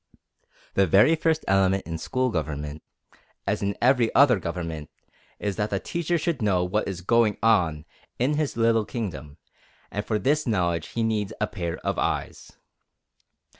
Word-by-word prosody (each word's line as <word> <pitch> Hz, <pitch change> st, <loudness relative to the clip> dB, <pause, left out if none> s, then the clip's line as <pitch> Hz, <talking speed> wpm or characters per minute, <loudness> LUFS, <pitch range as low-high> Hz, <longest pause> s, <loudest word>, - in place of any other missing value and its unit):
The 100 Hz, -1 st, +3 dB
very 105 Hz, -, +5 dB
first 160 Hz, 0 st, 0 dB
element 95 Hz, 0 st, +2 dB
in 80 Hz, 0 st, -5 dB
school 130 Hz, +7 st, -1 dB
government, 75 Hz, -3 st, -4 dB, 0.6 s
as 100 Hz, +1 st, -1 dB
in 100 Hz, 0 st, -1 dB
every 125 Hz, -2 st, +3 dB
other 130 Hz, -6 st, +6 dB
government, 85 Hz, -3 st, -5 dB, 0.5 s
is 100 Hz, -2 st, -3 dB
that 105 Hz, +1 st, 0 dB
the 100 Hz, -, -1 dB
teacher 170 Hz, -, -1 dB
should 165 Hz, -4 st, -2 dB
know 95 Hz, -4 st, +2 dB
what 95 Hz, +4 st, -1 dB
is 95 Hz, -3 st, -4 dB
going 110 Hz, +2 st, +2 dB
on 85 Hz, -9 st, +2 dB, 0.3 s
in 130 Hz, +5 st, +1 dB
his 150 Hz, -4 st, -1 dB
little 115 Hz, -1 st, +3 dB
kingdom, 95 Hz, -, -6 dB, 0.5 s
and 105 Hz, -, -3 dB
for 110 Hz, 0 st, -1 dB
this 145 Hz, +6 st, +1 dB
knowledge 85 Hz, -7 st, 0 dB
he 115 Hz, -, -2 dB
needs 110 Hz, -3 st, -1 dB
a 105 Hz, -, +2 dB
pair 85 Hz, -6 st, -4 dB
of -, -, -1 dB
eyes. -, -, -3 dB
105 Hz, 160 wpm, -25 LUFS, 90-120 Hz, 0.6 s, other